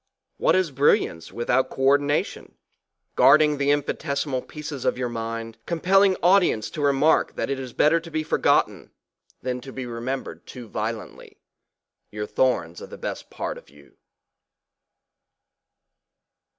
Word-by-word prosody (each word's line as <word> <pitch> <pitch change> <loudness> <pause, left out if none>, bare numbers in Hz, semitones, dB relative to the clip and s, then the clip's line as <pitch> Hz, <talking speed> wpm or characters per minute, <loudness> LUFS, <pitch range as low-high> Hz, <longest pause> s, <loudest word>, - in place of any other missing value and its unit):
What 165 - +3
is 185 -4 +1
brilliance 130 - +1
without 125 +2 0
co 135 - -5
ordina 145 +2 +3
tion? - - -12 0.6
Guarding 150 -1 +5
the 140 0 +1
infinitesimal 140 -2 -1
pieces 150 -2 -7
of - - 0
your 125 -1 -2
mind, 115 -1 -5
compelling 190 +3 +3
audience 175 - +3
to - - -7
the 145 - +2
remark 140 +3 +2
that - - -2
it 135 - -2
is 130 -2 -6
better 155 +7 +3
to 165 0 -11
be 155 -1 -2
forgotten - - +1 0.5
than 125 0 -3
to 135 - -10
be 130 -1 -6
remembered 120 +3 -5
too 125 -3 -9
violently, 110 +1 -6 0.7
your 105 0 -5
thorns 90 -9 0
are - - -8
the - - -10
besl: - - -6
part - - -5
of - - -22
you. 70 +1 -20
135 Hz, 145 wpm, -24 LUFS, 120-150 Hz, 0.7 s, Guarding